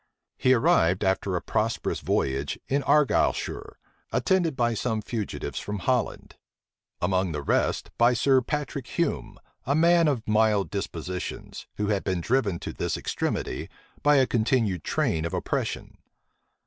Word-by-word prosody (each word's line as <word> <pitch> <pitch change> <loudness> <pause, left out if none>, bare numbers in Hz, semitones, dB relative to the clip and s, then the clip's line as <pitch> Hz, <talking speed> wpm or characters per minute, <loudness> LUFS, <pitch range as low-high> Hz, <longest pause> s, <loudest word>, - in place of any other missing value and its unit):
He 130 - +4
arrived, 90 -5 +3
after 95 0 0
a 90 - -2
prosperous 115 +2 -1
voyage, 70 +1 -1
in 140 +1 +1
Argyleshire, 150 0 +1 0.3
attended 175 -6 +1
by 120 -2 +1
some 110 0 -1
fugitives 110 -1 -4
from 105 0 -4
Holland; 120 +5 -1 0.6
among 95 -1 0
the 75 -1 -4
rest, - - 0
by 120 +1 +5
Sir 130 +2 +4
Patrick 140 -1 -4
Hume, 170 -3 -2 0.3
a 140 - +2
man 170 +1 +5
of 130 -7 -1
mild 105 -2 +2
dispositions, 90 -2 -5
who 105 0 -1
had 100 -2 0
been 95 -2 -1
driven 105 -1 +1
to - - -5
this - - -2
extremity - - -3 0.3
by 145 0 +5
a 135 -2 +5
continued 110 - +1
train 80 -1 0
of 85 - -3
oppression. - - -3
110 Hz, 140 wpm, -26 LUFS, 95-135 Hz, 0.6 s, by